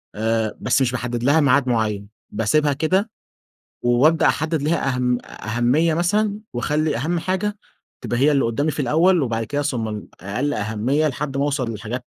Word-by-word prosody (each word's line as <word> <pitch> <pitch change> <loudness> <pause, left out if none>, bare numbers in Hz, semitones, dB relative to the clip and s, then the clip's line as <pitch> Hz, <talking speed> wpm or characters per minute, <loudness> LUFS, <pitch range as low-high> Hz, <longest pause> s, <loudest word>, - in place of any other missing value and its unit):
آآ، 110 0 -1
بس 125 +5 +2
مش 125 - +2
باحدّد 120 -1 -3
لها 145 +5 +4
ميعاد 140 -2 +3
معيّن، 105 -4 -1 0.2
باسيبها 145 +8 +1
كده، 185 +9 0 0.7
وأبدأ 130 +7 +4
أحدّد 160 0 0
لها 145 -3 0
أهم 125 -1 +1
أهمية 120 +9 0
مثلًا، 205 +5 +1
واخلّي 150 +4 0
أهم 165 +8 -1
حاجة 190 +4 -2 0.4
تبقى 120 - -2
هي 145 +3 +4
اللي 140 -2 +2
قُدّامي 140 +7 0
في 150 - -7
الأول، 165 +7 +3
وبعد 115 -4 -1
كده 145 +5 -2
ثم 120 -6 -2
ال 105 -1 -6
أقل 125 +10 -2
أهمية 110 +9 0
لحد 140 -1 -4
ما 140 - +1
اوصل 140 -4 -1
للحاجات 115 +3 -5
135 Hz, 165 wpm, -21 LUFS, 115-155 Hz, 0.7 s, لها